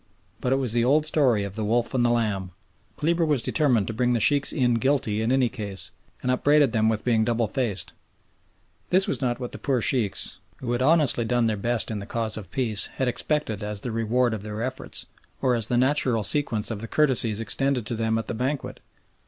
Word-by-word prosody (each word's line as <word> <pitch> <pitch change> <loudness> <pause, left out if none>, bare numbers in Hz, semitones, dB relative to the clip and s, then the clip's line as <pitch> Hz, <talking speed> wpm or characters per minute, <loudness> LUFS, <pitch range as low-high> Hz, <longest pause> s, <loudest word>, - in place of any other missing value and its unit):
But 125 - -2
it - - +4
was 130 -4 0
the 120 -1 +2
old 150 +5 +3
story 130 -9 +2
of 100 -1 -6
the 110 - -3
wolf 120 +3 0
and 125 -2 +2
the 120 - +3
lamb. 105 -6 -1 0.5
Kleber 165 +2 +1
was 150 -7 +1
determined 125 -10 +1
to 110 - -4
bring 125 +2 +1
the 120 - +1
Sheikhs 140 +4 +3
in 125 -5 +1
guilty 125 -5 0
in 115 +2 0
any 130 -1 +3
case, 105 -4 -6 0.3
and 125 - +1
upbraided 145 +1 +3
them 110 0 +2
with 110 -1 -2
being 115 -3 +2
double 115 0 0
faced. 115 -5 -3 1.0
This 190 +1 +3
was - - -2
not 120 -2 -1
what 125 -2 -5
the - - -8
poor 135 -3 0
Sheikhs, 115 -3 0 0.2
who 120 -2 -5
had 120 +1 -1
honestly 145 -4 +4
done 120 +1 +1
their 110 -1 +1
best 115 +3 0
in 105 - -3
the 100 - -8
cause 115 -2 -2
of 100 -5 -7
peace, 110 -4 0
had 130 - -1
expected 125 -4 0
as 105 -1 -4
the 120 - -4
reward 115 +2 +1
of 110 - -4
their 105 +2 -5
efforts, 130 +1 -4 0.3
or 130 - +1
as 115 -3 0
the 120 - +1
natural 130 -3 +2
sequence 120 -3 +1
of 105 -2 -5
the 115 - -5
courtesies 120 -7 +2
extended 125 +2 -1
to 115 - -4
them 110 0 0
at 115 - -3
the - - -3
banquet. 130 +5 -3
120 Hz, 220 wpm, -25 LUFS, 110-130 Hz, 1.0 s, it